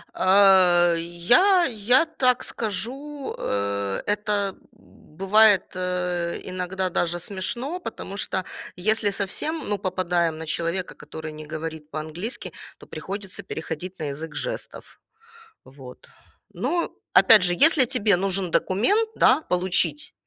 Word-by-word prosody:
Э, 185 -3 +5
я 240 - +3
я 245 +4 +2
так 255 -6 +1
скажу, 265 +7 -4
э, 100 -1 -2
это 205 -1 -1 0.6
бывает, 205 +1 +5
э, 180 -1 -2
иногда 185 +1 -3
даже 175 0 -1
смешно, 235 - -3
потому 200 - -8
что 190 - -2 0.3
если 215 +3 +2
совсем, 300 - -3
ну, 205 - 0
попадаем 175 -3 -1
на 160 - -7
человека, 170 +3 -3
который 155 -1 -9
не 155 0 -10
говорит 160 -1 -7
по-английски, 155 - -4 0.3
то - - -16
приходится 200 0 -7
переходить 175 +1 -6
на 155 - -4
язык 160 +3 -8
жестов. - - -7 0.7
Вот. 130 -1 -14 0.5
Ну, 345 -1 -2 0.2
опять 220 -3 +7
же, 180 -1 +2
если 280 - +8
тебе 225 -6 +2
нужен 190 -1 -1
документ, 405 - +1
да, - - +4
получить, 180 - -1
185 Hz, 120 wpm, -23 LUFS, 170-220 Hz, 0.7 s, если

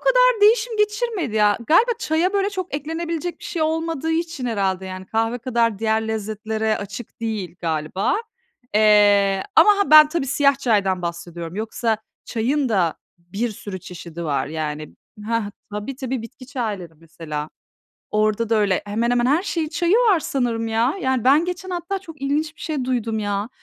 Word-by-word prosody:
kadar - - +4
değişim 440 +2 +4
geçirmedi 420 - 0
ya, 210 0 +4
galiba 450 +10 +5
çaya 335 +1 +1
böyle 400 0 +1
çok 370 -6 -5
eklenebilecek 330 +3 -3
bir - - -13
şey 330 -3 -2
olmadığı 320 -1 -1
için 325 -5 -2
herhâlde, 190 -4 -1
yani, 185 0 -7
kahve 225 +3 0
kadar 230 -3 0
diğer 220 0 0
lezzetlere 220 0 -2
açık 205 +4 -8
değil 215 -6 -3
galiba. 160 - -1 0.6
Eee, 205 -2 +5
ama 420 - +8
ha 400 - +1
ben 305 -1 +10
tabii 305 -4 -2
siyah 280 +1 +3
çaydan 200 -8 +1
bahsediyorum, 170 0 -5
yoksa 220 +1 -1 0.3
çayın 260 +4 0
da 180 -7 +1 0.2
bir 195 +8 -3
sürü 200 -3 -7
çeşidi 170 -1 -8
var. 140 -3 0
Yani, 155 0 -5 0.3
hah, 230 -3 -1 0.2
tabii, 210 +6 -5
tabii 260 -3 -3
bitki 255 +2 -11
çayları 215 - -4
mesela. 155 -2 -6 0.6
Orada 215 +1 +1
da 225 - +3
öyle, 200 -3 +2
hemen 230 +4 0
hemen 240 0 +2
her 300 +8 +2
şeyin 330 -6 -2
çayı 345 +4 +2
var 440 -8 +4
sanırım 235 -6 -1
ya. 225 +4 +1
Yani, 260 -3 0
ben 290 +6 +5
geçen 360 +1 -5
hatta 360 +2 -3
çok 325 -6 -13
ilginç 300 +3 -1
bir - - -15
şey 295 -6 -2
duydum, 230 -3 -1
ya. 205 +1 -2
230 Hz, 165 wpm, -22 LUFS, 205-315 Hz, 0.6 s, ben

